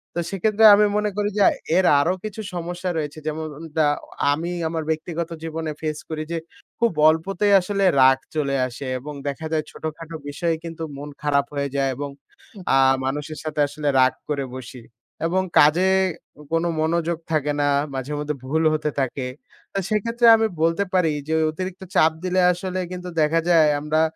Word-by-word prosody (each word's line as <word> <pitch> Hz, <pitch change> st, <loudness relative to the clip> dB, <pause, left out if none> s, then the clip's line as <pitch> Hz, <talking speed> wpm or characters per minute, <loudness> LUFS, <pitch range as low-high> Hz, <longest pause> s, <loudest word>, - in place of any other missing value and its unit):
তো -, -, -1 dB
সেক্ষেত্রে 215 Hz, +3 st, +2 dB
আমি 210 Hz, +1 st, +4 dB
মনে 210 Hz, 0 st, +1 dB
করি 205 Hz, 0 st, +1 dB
যে, 205 Hz, -, +5 dB, 0.3 s
এর 185 Hz, -, +3 dB
আরো 165 Hz, +6 st, +2 dB
কিছু 215 Hz, 0 st, -5 dB
সমস্যা 175 Hz, +1 st, -4 dB
রয়েছে। 150 Hz, 0 st, -4 dB
যেমন 155 Hz, +1 st, -3 dB
উন 165 Hz, -, -9 dB
দা 155 Hz, -2 st, +4 dB, 0.4 s
আমি 165 Hz, +4 st, -2 dB, 0.2 s
আমার 160 Hz, 0 st, -3 dB
ব্যক্তিগত 160 Hz, +1 st, -2 dB
জীবনে 160 Hz, -1 st, -4 dB
ফেস 155 Hz, -1 st, -2 dB
করি। 155 Hz, -1 st, -3 dB
যে, 170 Hz, -, -1 dB, 0.4 s
খুব 235 Hz, 0 st, +3 dB, 0.2 s
অল্পতেই 195 Hz, +5 st, +1 dB
আসলে 200 Hz, +2 st, -1 dB, 0.2 s
রাগ 130 Hz, 0 st, +6 dB, 0.2 s
চলে 140 Hz, -3 st, 0 dB
আসে 130 Hz, +3 st, -8 dB
এবং 150 Hz, +4 st, -8 dB
দেখা 140 Hz, +3 st, -4 dB
যায় 155 Hz, -1 st, +1 dB
ছোটখাটো 160 Hz, +1 st, -7 dB
বিষয়ে 165 Hz, +3 st, -1 dB
কিন্তু 165 Hz, -1 st, -6 dB
মন 145 Hz, +1 st, -7 dB
খারাপ 140 Hz, -1 st, +2 dB
হয়ে 140 Hz, 0 st, -1 dB
যায় 135 Hz, -1 st, +1 dB
এবং 145 Hz, 0 st, -4 dB, 0.7 s
আ -, -, +5 dB, 0.3 s
মানুষের 145 Hz, +3 st, -3 dB
সাথে 155 Hz, -1 st, -4 dB
আসলে 145 Hz, +1 st, -5 dB
রাগ 130 Hz, 0 st, +5 dB, 0.2 s
করে 140 Hz, -2 st, -1 dB
বসি। 130 Hz, -1 st, -9 dB, 0.5 s
এবং 185 Hz, +3 st, +1 dB, 0.2 s
কাজে 165 Hz, +6 st, +5 dB, 0.7 s
কোনো 165 Hz, +1 st, +2 dB
মনোযোগ 170 Hz, +1 st, 0 dB
থাকে 150 Hz, -2 st, +1 dB
না, 145 Hz, -, +2 dB, 0.3 s
মাঝেমধ্যে 150 Hz, +3 st, -3 dB
ভুল 160 Hz, +5 st, 0 dB
হতে 155 Hz, 0 st, -1 dB
থাকে। 130 Hz, 0 st, -2 dB, 0.5 s
তো 195 Hz, -, 0 dB
সেক্ষেত্রে 230 Hz, +3 st, +2 dB
আমি 220 Hz, 0 st, +2 dB, 0.2 s
বলতে 165 Hz, +4 st, +2 dB
পারি 180 Hz, -4 st, +3 dB, 0.2 s
যে, 160 Hz, -, -1 dB, 0.2 s
অতিরিক্ত 185 Hz, +3 st, -6 dB
চাপ 160 Hz, -, +5 dB
দিলে 185 Hz, 0 st, +1 dB
আসলে 185 Hz, +1 st, -3 dB
কিন্তু 180 Hz, 0 st, -6 dB
দেখা 155 Hz, +2 st, +3 dB
যায় 165 Hz, -3 st, +6 dB
আমরা 155 Hz, +1 st, +1 dB
160 Hz, 170 wpm, -23 LUFS, 150-180 Hz, 0.7 s, রাগ